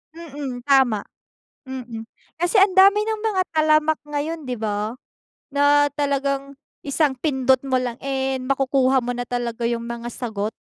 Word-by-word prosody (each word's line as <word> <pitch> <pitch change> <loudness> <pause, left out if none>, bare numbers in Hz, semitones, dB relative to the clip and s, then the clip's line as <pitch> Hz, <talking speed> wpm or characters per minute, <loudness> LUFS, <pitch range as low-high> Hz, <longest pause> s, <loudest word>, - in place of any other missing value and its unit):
Mm, 285 -7 -7
tama. 260 -6 +3 0.6
Mm, 245 -4 -6 0.4
kasi 350 +4 0
andami 390 +1 +6
ng 435 0 -3
mga 420 -4 +1
talamak 310 0 +3
ngayon 295 +3 -3
'di 250 - -2
ba? 215 +1 -2 0.6
Na 290 +1 +4
talagang 280 -1 -1 0.3
isang 285 0 +1
pindot 265 -1 +2
mo 260 -2 0
lang, 250 -2 -2
eh, 265 -1 -2
makukuha 265 0 +2
mo 245 -1 -2
na 245 - -3
talaga 240 -1 -4
yung 235 0 -3
mga 235 0 -5
sagot. 220 -4 -4
270 Hz, 140 wpm, -22 LUFS, 245-295 Hz, 0.6 s, andami